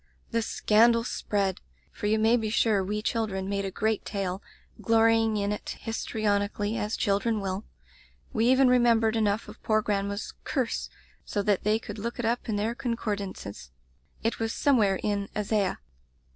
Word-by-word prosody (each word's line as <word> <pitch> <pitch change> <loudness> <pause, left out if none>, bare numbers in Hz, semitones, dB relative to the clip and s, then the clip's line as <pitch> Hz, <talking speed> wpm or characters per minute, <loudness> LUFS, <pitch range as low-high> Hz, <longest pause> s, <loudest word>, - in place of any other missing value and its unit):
"The 230 -1 +1
scandal 230 +1 +3
spread, 200 -5 -1 0.3
for 210 - -4
you 215 +1 +3
may 220 +2 +4
be 220 -3 -1
sure 215 -3 +2
we 210 +2 -3
children 210 -5 -1
made 200 0 -1
a - - -2
great 215 +2 -1
tale; 195 -2 -3 0.4
glorying 225 -1 +3
in 200 0 0
it, 210 - -5
histrionically, 210 -2 -1
as 210 -1 -2
children 210 +2 +1
will. 195 +1 -3 0.7
We 230 -1 +2
even 260 +1 +5
re 250 0 +5
membered 230 -2 +3
enough 215 -1 +1
of - - -12
poor 215 -1 +2
grandma's 200 0 -2
'curse 255 -5 -1 0.2
* - - -30
so 205 - -2
that 205 -2 +1
they 215 +1 +3
could 225 - -8
look 235 +3 -4
it 240 - -2
up 235 +1 -1
in 215 - 0
their 215 +3 0
con 240 -1 -2
cordances. 200 - -5 0.5
It 225 - 0
was 225 0 -1
somewhere 215 -9 +3
in 200 -1 -1
Isaiah. 205 -2 0
215 Hz, 170 wpm, -27 LUFS, 200-230 Hz, 0.7 s, even